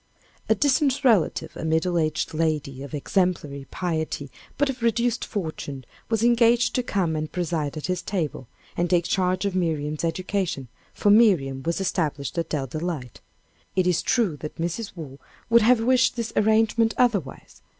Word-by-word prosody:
A - - +5
distant 285 0 +2
relative, 220 - +2
a - - -6
middle 160 +2 +1
aged 155 0 -1
lady 155 -4 -1
of 140 +2 -6
exemplary 150 -4 -1
piety, 160 -5 -3 0.3
but 285 +1 +2
of 260 -2 -4
reduced 235 +1 +1
fortune, 155 - -5 0.2
was 225 -1 +1
engaged 235 0 +4
to 250 - +1
come 190 -9 -1
and 155 0 -3
preside 165 -4 -2
at 155 - -4
his 185 -1 -1
table, 165 - -3 0.3
and 175 0 0
take 175 -2 +2
charge 185 +1 0
of 200 - -1
Miriam's 155 -4 -1
education, 170 - -2 0.2
for 205 - +2
Miriam 175 - +4
was 170 +5 -2
established 160 -5 -1
at 165 - -3
Dell 145 -4 -1
Delight. 155 -3 -5 0.5
It 185 -1 +2
is 180 -2 +2
true 210 - +1
that 150 +1 -7
Mrs. 175 +6 -3
Waugh 145 -5 -9 0.3
would 235 0 +7
have 235 +1 +4
wished 255 +1 +3
this 230 -2 -4
arrangement 220 +1 +3
otherwise. 205 - -1
175 Hz, 160 wpm, -24 LUFS, 155-220 Hz, 0.5 s, would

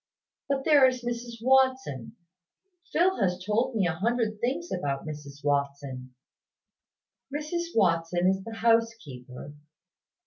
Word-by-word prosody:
"But 270 -1 -1
there 290 -4 +7
is 255 -1 -2
Mrs 235 -1 -5
Watson. 260 - +2 0.8
Phil 360 -2 +2
has 180 -2 +1
told 225 +4 0
me 200 -4 +2
a 175 - +1
hundred 220 +3 -1
things 285 +8 -1
about 140 -6 -2
Mrs 145 -2 -8
Watson." 140 -3 -2 1.2
"Mrs 305 +4 -3
Watson 175 -2 +2
is 190 0 +1
the 225 +1 -7
housekeeper. 225 - -1
215 Hz, 115 wpm, -27 LUFS, -, 1.2 s, there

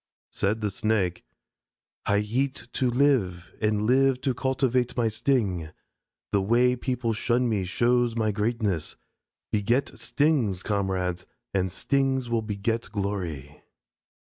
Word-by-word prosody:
Said 105 +3 0
the 105 -1 -1
Snake: 95 -3 0 0.8
"I 100 - +3
eat 125 +7 -1
to 130 - +1
live, 120 -10 +1
and 105 -1 +1
live 130 +2 +3
to 130 -1 +1
cultivate 130 -1 0
my 115 -2 +2
sting. 105 - 0 0.6
The 100 - +3
way 120 +5 +3
people 125 -2 -1
shun 120 +3 +1
me 105 -5 0
shows 120 +4 +2
my 110 -2 +1
greatness. 105 -6 -1 0.6
Beget 115 +6 0
stings, 130 - +1
comrades, 95 -3 -1 0.3
and 95 -2 0
stings 130 +3 0
will 115 -1 +2
beget 110 +2 -2
glory." 90 -9 -4
110 Hz, 120 wpm, -26 LUFS, 100-125 Hz, 0.8 s, I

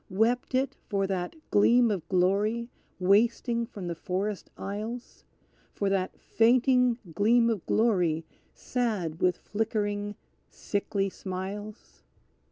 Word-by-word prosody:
Wept 230 +6 +1
it 265 +1 +1
for 200 -3 +1
that 185 - -3 0.2
gleam 235 +3 +5
of 175 -5 -4
glory 205 +6 +1 0.3
wasting 230 +5 +2
from 200 -6 -8
the 175 - -2
forest 190 +4 -3
aisles; 215 +5 -6 0.5
For 200 - 0
that 190 -1 -1
fainting 250 +1 +3 0.2
gleam 230 +6 +4
of 210 -6 -3
glory 180 -8 +2 0.3
sad 210 -10 -2
with 180 -1 +3
flickering, 205 -1 -2 0.3
sickly 200 -1 -2
smiles? 190 - -7
205 Hz, 110 wpm, -28 LUFS, 190-230 Hz, 0.5 s, gleam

